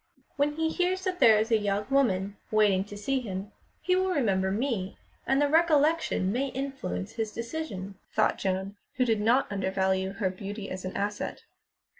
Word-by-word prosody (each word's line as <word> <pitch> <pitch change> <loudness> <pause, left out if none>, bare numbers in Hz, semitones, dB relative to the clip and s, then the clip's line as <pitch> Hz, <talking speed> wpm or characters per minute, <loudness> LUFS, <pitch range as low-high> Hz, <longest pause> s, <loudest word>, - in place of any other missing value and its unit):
"When 290 +1 +1
he 320 +1 0
hears 365 +3 0
that 370 -1 -2
there 220 -2 +7
is 220 +2 0
a 225 - +5
young 205 0 -1
woman 200 -8 +2
waiting 205 -3 +3
to 205 0 -9
see 270 +6 0
him, 200 -3 -5 0.3
he 365 - +3
will 375 +1 +1
remember 200 - +1
me, 210 -3 -2 0.3
and 270 +1 +3
the 290 - +4
recollection 310 - +3
may 260 +5 0
influence 270 - -4
his 220 -2 -3
decision," 230 -7 -5 0.2
thought - - +2
Joan, 190 +1 -2 0.2
who 255 - +2
did 225 -3 +1
not 235 +5 +4
under 195 -1 -1
value 190 0 0
her 195 -2 -1
beauty 195 +2 -6
as 185 0 -5
an 185 - -4
asset. 205 +1 -3
215 Hz, 180 wpm, -28 LUFS, 195-275 Hz, 0.3 s, there